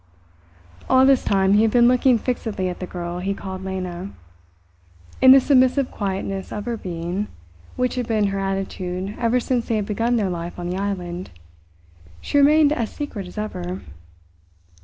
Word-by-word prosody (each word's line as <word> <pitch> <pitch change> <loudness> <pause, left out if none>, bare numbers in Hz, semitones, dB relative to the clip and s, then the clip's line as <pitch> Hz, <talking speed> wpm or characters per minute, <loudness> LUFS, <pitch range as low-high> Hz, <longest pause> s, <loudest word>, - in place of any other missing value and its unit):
All 260 0 +6
this 270 -1 +4
time 195 0 +2
he 210 - +5
had 225 - +4
been 240 +1 +5
looking 250 0 +4
fixedly 220 -5 -2
at 180 - -6
the 185 - -5
girl 175 0 -5
he 195 +2 -2
called 190 -1 -7
Lena. 185 -1 -5 1.1
In 260 - +7
the 270 - +9
submissive 260 0 +3
quietness 195 -1 -4
of 210 - -5
her 240 -1 -2
being, 180 +1 -4 0.5
which 250 0 0
had 250 -2 -3
been 215 -3 +1
her 195 - -2
attitude 195 0 -3
ever 235 +1 +2
since 245 -1 -1
they 230 - 0
had 210 -2 -1
begun 230 +4 0
their 210 -4 +1
life 170 0 -5
on 175 0 -4
the 185 - -3
island, 185 -3 -4 0.9
she 285 - 0
remained 300 +1 +5
as 230 -7 -2
secret 225 -11 -6
as 180 - -13
ever. 95 - -4
200 Hz, 170 wpm, -22 LUFS, 185-245 Hz, 1.1 s, the